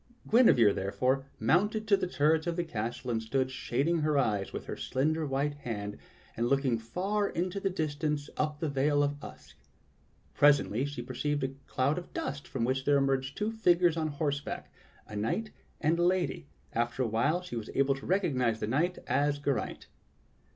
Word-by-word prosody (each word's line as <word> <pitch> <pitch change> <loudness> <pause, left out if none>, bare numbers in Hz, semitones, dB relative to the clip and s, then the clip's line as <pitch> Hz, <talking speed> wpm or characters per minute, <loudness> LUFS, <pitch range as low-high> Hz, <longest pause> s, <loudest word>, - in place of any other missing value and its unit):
Guinevere, 125 - +6
therefore, 125 +8 0
mounted 210 - +2
to 205 - +6
the 190 - -1
turrets 160 -1 +2
of 170 - 0
the 175 - 0
castle 120 -3 -4
and 110 -1 0
stood 130 +3 -1
shading 140 +6 0
her 150 -1 +1
eyes 105 -7 +1
with - - -6
her - - -5
slender 155 +4 0
white 140 +2 0
hand 105 -6 -5 0.4
and 120 +1 0
looking 135 -3 +2
far 195 - -1
into 180 +3 -2
the 195 - 0
distance 150 -3 -2
up 150 -1 -1
the 160 - -1
vale 145 +1 +2
of 145 0 -2
Usk. - - -12 0.8
Presently 140 -4 +4
she 145 -4 -5
per 130 +2 -8
ceived 145 +2 -1
a 135 - 0 0.2
cloud 140 +6 +1
of 175 - -13
dust 140 +1 -4
from 125 - -3
which 130 +1 0
there 145 0 +4
emerged 135 -1 0
two 210 +1 0
figures 175 -6 +3
on 160 -1 0
horseback 145 -1 -3 0.2
— - - -29
a 105 - -8
knight 115 - -1 0.3
and 160 +2 +1
a - - +3
lady, 175 -3 0 0.3
and 115 - +2
after 120 +2 -1
a - - 0
while 145 +11 +1
she 180 - -7
was 115 -2 -5
able 135 0 +3
to 135 - -8
recognize 130 - +1
the - - -1
knight 160 +11 0
as 145 0 +1
Geraint. 145 -1 -2
145 Hz, 190 wpm, -30 LUFS, 130-165 Hz, 0.8 s, Guinevere